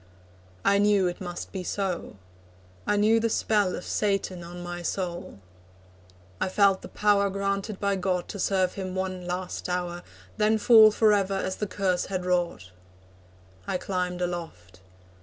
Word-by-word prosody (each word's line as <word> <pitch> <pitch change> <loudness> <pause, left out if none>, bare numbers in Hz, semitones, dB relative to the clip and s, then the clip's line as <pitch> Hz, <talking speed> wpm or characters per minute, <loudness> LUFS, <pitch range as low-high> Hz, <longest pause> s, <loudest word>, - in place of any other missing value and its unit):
I 200 0 +4
knew 205 -2 +4
it 175 +1 -3
must 175 -1 -6
be 190 - -4
so. 190 -1 -3 0.7
I 205 - +2
knew 220 +2 +4
the 230 0 +1
spell 210 -4 +1
Of - - -7
Satan 195 -4 -1
on 175 +1 -8
my 175 0 -5
soul. 180 - -4 1.0
I - - 0
felt 195 0 +3
the - - -8
power 205 -1 +2
Granted 195 +1 -2
by 200 -1 0
God 180 -1 -1
to 200 - -6
serve 185 -1 +1
Him 185 -1 -5
one 185 -1 -3
last 180 0 -4
hour, 175 -1 -2 0.4
Then 215 0 +3
fall 220 0 +8
for 215 0 +4
ever 195 -1 +1
as 190 -1 -2
the 210 - -2
curse 190 -3 0
had 185 -2 -3
wrought. 175 - -1 1.0
I - - 0
climbed 180 -1 -2
aloft. 130 - -6
190 Hz, 160 wpm, -27 LUFS, 180-200 Hz, 1.0 s, fall